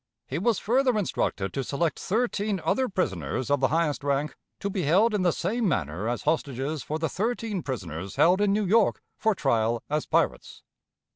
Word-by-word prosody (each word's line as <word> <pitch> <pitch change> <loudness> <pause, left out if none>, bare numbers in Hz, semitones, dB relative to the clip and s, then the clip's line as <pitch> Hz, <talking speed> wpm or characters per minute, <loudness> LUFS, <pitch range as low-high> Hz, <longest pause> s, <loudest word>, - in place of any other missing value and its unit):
He - - -3
was 235 -4 +2
further 250 +1 +2
instructed 105 - -1
to 135 - -2
select 155 +5 -1
thirteen 210 -2 0
other 260 -1 +1
prisoners 115 - -2
of 145 - +3
the 135 - +3
highest 155 -2 0
rank, 140 0 0 0.2
to - - -2
be 195 -1 -2
held 190 +9 +3
in 210 - +1
the 180 -1 +3
same 215 +8 -1
manner 95 - -1
as 120 - -3
hostages 145 -1 -1
for 155 - -3
the 160 0 -1
thirteen 220 +2 -2
prisoners 95 - -5
held 180 +4 +4
in 205 -1 +3
New 210 +1 +1
York 215 +3 +3
for 220 -2 +1
trial 115 -6 +1
as 150 0 0
pirates. - - 0
165 Hz, 185 wpm, -26 LUFS, 135-205 Hz, 0.2 s, held